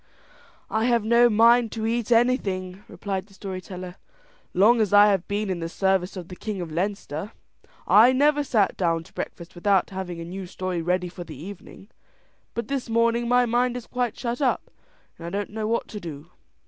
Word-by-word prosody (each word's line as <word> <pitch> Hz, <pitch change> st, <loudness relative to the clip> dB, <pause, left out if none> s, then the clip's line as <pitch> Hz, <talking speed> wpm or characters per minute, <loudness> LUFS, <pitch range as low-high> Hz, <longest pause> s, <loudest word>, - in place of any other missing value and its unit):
"I 220 Hz, +1 st, +1 dB
have 235 Hz, -3 st, +2 dB
no 235 Hz, +1 st, +5 dB
mind 230 Hz, +1 st, +5 dB
to 220 Hz, -1 st, -3 dB
eat 230 Hz, 0 st, -1 dB
anything," 200 Hz, -6 st, +1 dB
replied 195 Hz, -1 st, -4 dB
the 195 Hz, -, -19 dB
story 190 Hz, -2 st, -6 dB
teller; 180 Hz, 0 st, -8 dB, 0.5 s
"long 225 Hz, +5 st, +4 dB
as 205 Hz, -2 st, 0 dB
I 205 Hz, +1 st, +8 dB
have 190 Hz, -3 st, -1 dB
been 205 Hz, +1 st, -1 dB
in 185 Hz, -2 st, -2 dB
the 165 Hz, 0 st, -4 dB
service 190 Hz, +1 st, 0 dB
of 175 Hz, -2 st, -7 dB
the 180 Hz, -, -9 dB
king 210 Hz, +1 st, -5 dB
of 170 Hz, -3 st, -5 dB
Leinster, 190 Hz, +1 st, -3 dB, 0.5 s
I 230 Hz, +4 st, +7 dB
never 290 Hz, +3 st, +3 dB
sat 215 Hz, -8 st, +1 dB
down 165 Hz, -3 st, 0 dB
to -, -, -20 dB
breakfast 170 Hz, -1 st, -7 dB
without 190 Hz, +1 st, +1 dB
having 185 Hz, -3 st, -5 dB
a 165 Hz, -, -6 dB
new 185 Hz, +2 st, -7 dB
story 185 Hz, -1 st, -3 dB
ready 180 Hz, +2 st, 0 dB
for 175 Hz, 0 st, -8 dB
the 155 Hz, -4 st, -10 dB
evening, 195 Hz, +3 st, -10 dB, 0.7 s
but 235 Hz, -2 st, -3 dB
this 270 Hz, -3 st, -3 dB
morning 230 Hz, +1 st, +2 dB
my 245 Hz, +1 st, +4 dB
mind 245 Hz, +1 st, +1 dB
is 240 Hz, -, -8 dB
quite 245 Hz, -3 st, -2 dB
shut 240 Hz, +2 st, -3 dB
up, 265 Hz, -, 0 dB, 0.5 s
and 170 Hz, -, -7 dB
I -, -, -3 dB
don't 200 Hz, +3 st, -3 dB
know 215 Hz, 0 st, -3 dB
what 230 Hz, +1 st, -1 dB
to 210 Hz, -, -6 dB
do. 160 Hz, -2 st, -9 dB
205 Hz, 200 wpm, -25 LUFS, 180-235 Hz, 0.7 s, I